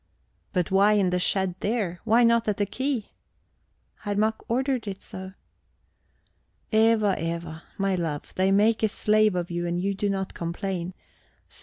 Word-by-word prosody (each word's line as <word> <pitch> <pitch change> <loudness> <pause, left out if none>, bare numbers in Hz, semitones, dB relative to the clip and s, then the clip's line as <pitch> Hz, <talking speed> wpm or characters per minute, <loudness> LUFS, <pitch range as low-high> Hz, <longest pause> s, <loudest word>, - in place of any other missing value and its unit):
"But 180 -3 -1
why 200 +2 +5
in 195 -3 +2
the 180 - +1
shed 190 0 +1
there? 200 -6 -1
Why 230 +2 +5
not 230 -1 +3
at 210 - 0
the 205 - +1
quay?" 260 +1 -3 0.9
"Herr 205 -1 -3
Mack 220 +2 +1
ordered 255 -1 0
it 195 -1 -6
so.. 190 0 -8 1.4
"Eva, 220 -2 +4
Eva, 165 -1 -4 0.2
my 195 -1 +1
love, 165 -5 -3
they 190 +1 +2
make 215 +3 +3
a 220 - +4
slave 215 -1 +2
of 175 -1 -2
you 175 0 -2
and 175 0 -1
you 200 +2 0
do 200 +1 -1
not 195 -1 -2
complain. 180 +1 -4 0.5
See! - - -8
195 Hz, 165 wpm, -26 LUFS, 180-215 Hz, 1.4 s, why